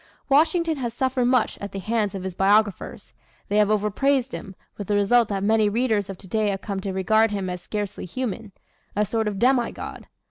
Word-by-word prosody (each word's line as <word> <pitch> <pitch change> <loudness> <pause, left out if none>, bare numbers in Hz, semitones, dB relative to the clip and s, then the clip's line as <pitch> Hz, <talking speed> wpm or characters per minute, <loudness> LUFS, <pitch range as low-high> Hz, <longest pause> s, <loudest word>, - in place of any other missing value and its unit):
Washington 320 +3 +3
has 240 -3 -4
suffered 260 -1 0
much 250 -2 +1
at 200 - -6
the - - -4
hands 210 0 -1
of 190 - -5
his 190 -1 -4
biographers. 205 +2 +1 0.4
They 205 - +1
have 210 -1 +4
over 210 0 +1
praised 270 +2 +1
him, 195 -3 -7 0.2
with 205 - -7
the 205 - +1
result 220 +3 +4
that 195 -2 -2
many 215 0 +3
readers 215 -3 0
of 195 - -6
today 210 +3 -1
have 195 -1 -3
come 200 -3 -4
to 195 0 -4
regard 215 +4 +3
him 195 -3 -3
as 180 -1 -6
scarcely 205 0 -4
human 220 +1 -4 0.4
a 210 +1 +2
sort 220 +1 -1
of 205 -2 -2
demi 245 +2 +2
god. - - -8
210 Hz, 210 wpm, -24 LUFS, 200-240 Hz, 0.4 s, have